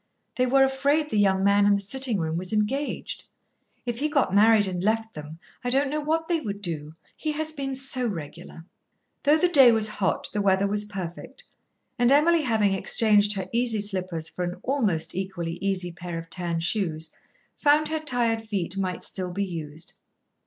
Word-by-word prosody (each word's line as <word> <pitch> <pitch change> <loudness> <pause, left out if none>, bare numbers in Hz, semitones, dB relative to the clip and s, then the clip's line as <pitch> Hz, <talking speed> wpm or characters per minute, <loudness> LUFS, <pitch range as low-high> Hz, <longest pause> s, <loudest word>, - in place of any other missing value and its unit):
"They 255 0 +1
were 270 +2 +5
afraid 280 +3 +1
the 210 - +1
young 190 -1 +3
man 200 0 +4
in 205 - +5
the - - 0
sitting 240 +3 0
room 160 -1 -2
was 180 +2 -3
engaged. 230 +7 -2 0.6
If 240 -1 -3
he 300 +2 0
got 280 - +1
married 215 +1 +5
and 180 -2 -3
left 220 +2 0
them, 150 +1 -9 0.3
I 245 - -1
don't 270 +2 +2
know 305 - -1
what 320 +2 -1
they 340 -2 +1
would 205 -8 -5
do; 155 -6 -5 0.2
he 310 -1 -3
has 315 +1 -2
been 275 -3 -4
so 260 -2 0
regular." 165 -2 -7 0.6
Though 295 +2 +4
the 360 - +3
day 275 -8 +7
was 220 -1 +3
hot, 205 -3 -1
the 210 - 0
weather 195 0 +3
was 205 +1 -1
perfect, 195 +5 -8 0.6
and 245 +1 +4
Emily, 320 +4 +5
having 220 -7 +2
exchanged 210 +1 +3
her 190 -2 -4
easy 235 -2 +1
slippers 185 -5 -3
for 180 - -5
an 175 0 -3
almost 220 - 0
equally 175 -3 -4
easy 190 -3 -1
pair 175 0 -6
of 165 0 -8
tan 170 -2 -2
shoes, 165 -4 -1 0.4
found 300 +1 +3
her 315 0 -1
tired 240 -6 0
feet 195 -5 -3
might 185 -2 -2
still 185 -2 -2
be 200 +3 -1
used. 160 -3 -6
205 Hz, 190 wpm, -25 LUFS, 180-265 Hz, 0.6 s, day